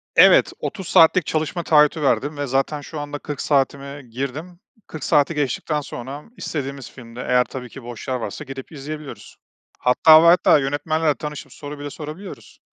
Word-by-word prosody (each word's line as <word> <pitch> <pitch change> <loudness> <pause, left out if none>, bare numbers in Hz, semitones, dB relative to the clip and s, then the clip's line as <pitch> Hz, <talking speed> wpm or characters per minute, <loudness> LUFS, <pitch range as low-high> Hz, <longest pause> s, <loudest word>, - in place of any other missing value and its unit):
Evet, - - +6
30 190 -5 -5
saatlik 165 +1 +5
çalışma 160 +2 -2
taahhüdü 150 0 +4
verdim 145 +1 0
ve 145 -1 -3
zaten 135 +3 -1
şu 155 +1 -8
anda 145 0 -5
40 150 -3 -6
saatime 140 0 -1
girdim. 145 +8 -5 0.3
40 155 -3 -8
saati 150 +2 +2
geçtikten 150 +2 -1
sonra 135 +2 -8
istediğimiz 140 -3 -5
filmde 120 -1 -12
eğer 125 0 +3
tabii 125 -2 -8
ki 135 - -11
boş 120 +2 -9
yer 130 - -1
varsa 115 -5 -5
gidip 135 +2 -9
izleyebiliyoruz. 150 0 -8 0.4
Hatta 155 +5 +6
ve - - +6
hatta 170 -3 +6
yönetmenle 145 +4 -1
de 150 - +3
tanışıp 150 -1 -7
soru 145 0 -9
bile 145 0 -5
sorabiliyoruz. 155 +7 -10
145 Hz, 170 wpm, -21 LUFS, 135-155 Hz, 0.4 s, Evet